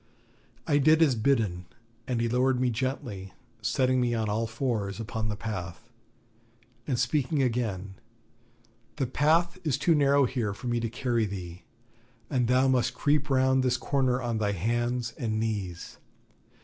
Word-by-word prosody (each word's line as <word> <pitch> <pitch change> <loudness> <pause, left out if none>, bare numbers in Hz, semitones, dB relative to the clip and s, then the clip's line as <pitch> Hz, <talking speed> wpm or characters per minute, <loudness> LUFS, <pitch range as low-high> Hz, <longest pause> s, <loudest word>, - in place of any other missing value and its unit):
I 145 -1 +3
did 155 +3 +5
as 145 -5 +4
bidden, 110 -7 0 0.4
and 125 -2 -1
he 115 - +1
lowered 125 +2 +2
me 125 -1 +1
gently, 115 -6 -4 0.3
setting 130 -1 +1
me 120 -1 +1
on 110 -2 -1
all 110 +2 0
fours 115 -4 -2
upon 110 -1 -3
the 105 - -2
path; 100 0 -6 1.0
and 130 -4 0
speaking 140 +3 +1
again: 110 -6 -2 1.0
'The 140 -3 -1
path 165 +7 +2
is 145 -5 0
too 165 +4 +3
narrow 140 -2 +4
here 115 -6 -2
for 125 - -11
me 120 -1 0
to 115 0 -2
carry 120 -2 0
thee, 90 -3 -7 0.7
and 125 -3 +1
thou 130 +2 +3
must 130 -2 +1
creep 150 0 +1
round 130 0 +3
this 125 -1 +1
corner 130 -3 +1
on 120 -3 -2
thy 105 -1 0
hands 120 +5 -1
and 110 -2 -1
knees. 100 -6 -4
120 Hz, 155 wpm, -28 LUFS, 110-130 Hz, 1.0 s, did